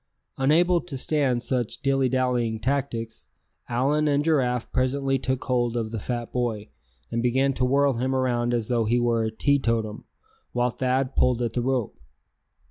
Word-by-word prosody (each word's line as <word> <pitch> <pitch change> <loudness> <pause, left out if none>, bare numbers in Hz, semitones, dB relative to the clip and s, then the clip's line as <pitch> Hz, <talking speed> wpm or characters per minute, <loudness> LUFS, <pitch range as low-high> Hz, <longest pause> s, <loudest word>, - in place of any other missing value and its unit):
Unable 170 +6 +3
to 150 -6 -7
stand 130 -3 0
such 125 -4 -2
dilly 135 -1 +2
dallying 125 -3 0
tactics, 115 -3 -3 0.4
Allan 140 +6 +1
and 145 0 +1
Giraffe 125 -6 +1
presently 135 +1 0
took 130 0 -2
hold 120 -2 0
of 110 -2 -2
the 115 - -3
fat 120 +2 -4
boy, 115 -4 -2 0.4
and 115 0 0
began 130 +3 +2
to 130 - 0
whirl 140 +2 +3
him 130 +3 -1
around 120 -2 0
as 120 -3 -1
though 120 -3 +1
he 120 +3 +2
were 120 -1 +1
a - - 0
teetotum, 115 -3 0 0.5
while 125 0 +1
Thad 130 +2 -1
pulled 125 -1 +2
at 115 -2 -2
the 120 - 0
rope. 125 -3 -1
125 Hz, 165 wpm, -25 LUFS, 120-135 Hz, 0.5 s, Unable